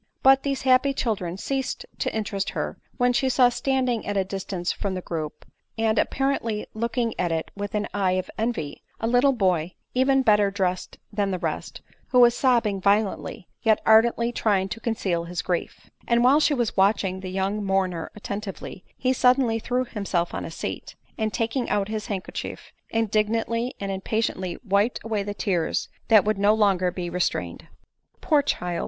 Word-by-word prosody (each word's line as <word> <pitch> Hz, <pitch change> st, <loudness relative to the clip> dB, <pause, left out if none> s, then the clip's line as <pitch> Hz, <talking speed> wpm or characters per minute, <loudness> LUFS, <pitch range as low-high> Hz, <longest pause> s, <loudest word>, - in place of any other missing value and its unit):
But 270 Hz, 0 st, +7 dB
these 275 Hz, -2 st, -2 dB
happy 260 Hz, +1 st, +4 dB
children 190 Hz, -9 st, -2 dB
ceased 265 Hz, +5 st, -3 dB
to -, -, 0 dB
interest 205 Hz, -3 st, -2 dB
her, -, -, -4 dB, 0.2 s
when 245 Hz, -1 st, +3 dB
she 265 Hz, +2 st, +2 dB
saw 250 Hz, -1 st, +5 dB
standing 255 Hz, -2 st, 0 dB
at 205 Hz, 0 st, -1 dB
a 195 Hz, -, +3 dB
distance 190 Hz, -2 st, -3 dB
from 195 Hz, -2 st, -3 dB
the 185 Hz, -, -3 dB
group, 155 Hz, -4 st, -5 dB, 0.3 s
and 225 Hz, 0 st, +2 dB
appa 270 Hz, -, -1 dB
rently 230 Hz, -6 st, 0 dB
looking 235 Hz, +1 st, -1 dB
at 175 Hz, -2 st, +1 dB
it 160 Hz, -1 st, -2 dB
with 205 Hz, +2 st, -4 dB
an 210 Hz, 0 st, 0 dB
eye 195 Hz, -2 st, +1 dB
of 185 Hz, 0 st, -1 dB
envy, 220 Hz, -10 st, -3 dB, 0.2 s
a -, -, -2 dB
little 245 Hz, +4 st, +4 dB
boy, 185 Hz, -8 st, 0 dB, 0.2 s
even 265 Hz, +1 st, +3 dB
better 210 Hz, -3 st, +4 dB
dressed 185 Hz, -2 st, -2 dB, 0.2 s
than 205 Hz, -1 st, 0 dB
the 185 Hz, -, -1 dB
rest; 165 Hz, -3 st, -4 dB, 0.2 s
who 250 Hz, -, +3 dB
was 240 Hz, -1 st, +7 dB
sobbing 230 Hz, -7 st, +2 dB
violently, 200 Hz, -2 st, 0 dB
yet 220 Hz, -2 st, +3 dB
ardently 235 Hz, +2 st, +4 dB
trying 200 Hz, -5 st, +1 dB
to 185 Hz, -, -5 dB
conceal 190 Hz, -7 st, -1 dB
his 175 Hz, +1 st, -4 dB
grief, 175 Hz, -2 st, -3 dB, 0.2 s
And 235 Hz, 0 st, +3 dB
while 270 Hz, +4 st, +6 dB
she 300 Hz, -1 st, +3 dB
was 240 Hz, -4 st, -1 dB
watching 195 Hz, -1 st, +2 dB
the 190 Hz, -1 st, -6 dB
young 195 Hz, +3 st, -1 dB
mourner 185 Hz, -4 st, 0 dB
attentively, 200 Hz, -2 st, -6 dB
he 255 Hz, 0 st, +1 dB
suddenly 250 Hz, -2 st, +3 dB
threw 250 Hz, +3 st, -1 dB
himself 200 Hz, -7 st, -2 dB
on -, -, -3 dB
a -, -, -5 dB
seat; -, -, -6 dB, 0.2 s
and, 220 Hz, -1 st, -1 dB
taking 230 Hz, +5 st, -1 dB
out 205 Hz, -1 st, 0 dB
his 215 Hz, -1 st, -4 dB
handkerchief, 195 Hz, -3 st, -5 dB, 0.2 s
indignantly 225 Hz, +3 st, 0 dB
and 200 Hz, -1 st, -3 dB
impatiently 190 Hz, -2 st, -2 dB
wiped 200 Hz, +5 st, +2 dB
away 220 Hz, -2 st, -1 dB
the 205 Hz, +1 st, -4 dB
tears 180 Hz, -6 st, -1 dB, 0.2 s
that 215 Hz, -3 st, +6 dB
would 215 Hz, -2 st, 0 dB
no 205 Hz, +2 st, +4 dB
longer 195 Hz, -4 st, +3 dB
be 180 Hz, 0 st, -4 dB
restrained. 180 Hz, 0 st, -2 dB, 0.3 s
" -, -, -45 dB
Poor 300 Hz, -3 st, +3 dB
child 175 Hz, -11 st, -2 dB
210 Hz, 180 wpm, -25 LUFS, 190-240 Hz, 0.3 s, But